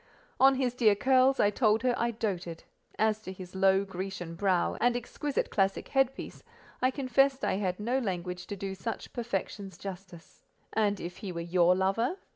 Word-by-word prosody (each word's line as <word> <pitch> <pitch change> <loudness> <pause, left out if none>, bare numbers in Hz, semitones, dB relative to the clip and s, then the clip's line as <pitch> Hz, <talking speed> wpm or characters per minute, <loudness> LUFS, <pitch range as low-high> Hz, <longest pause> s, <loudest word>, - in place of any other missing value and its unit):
On 270 0 +6
his 255 -2 0
dear 225 -5 +4
curls, 260 +4 +4
I 205 - +4
told 220 +1 +2
her 250 -1 +3
I 235 - 0
doated: 185 -7 -4 0.3
and 220 - +4
as 215 0 -3
to 185 - -7
his 185 -1 -10
low, 190 +1 +3
Grecian 185 -2 -5
brow, 185 0 +1
and 245 0 +3
exquisite 275 +4 -3
classic 195 -1 0
headpiece, 270 -1 -1 0.4
I 255 - +4
confessed 270 0 +2
I - - +1
had 185 -2 -2
no 240 +5 0
language 180 -5 -4
to 205 - -4
do 195 0 -4
such 225 +4 -6
perfections 200 -4 -4
justice. 185 -4 -10 0.3
"And 205 -2 +1
if 175 +1 -6
he 195 - -6
were 170 - -5
your 175 +1 +3
lover?" 210 - 0
200 Hz, 180 wpm, -29 LUFS, 185-245 Hz, 0.4 s, On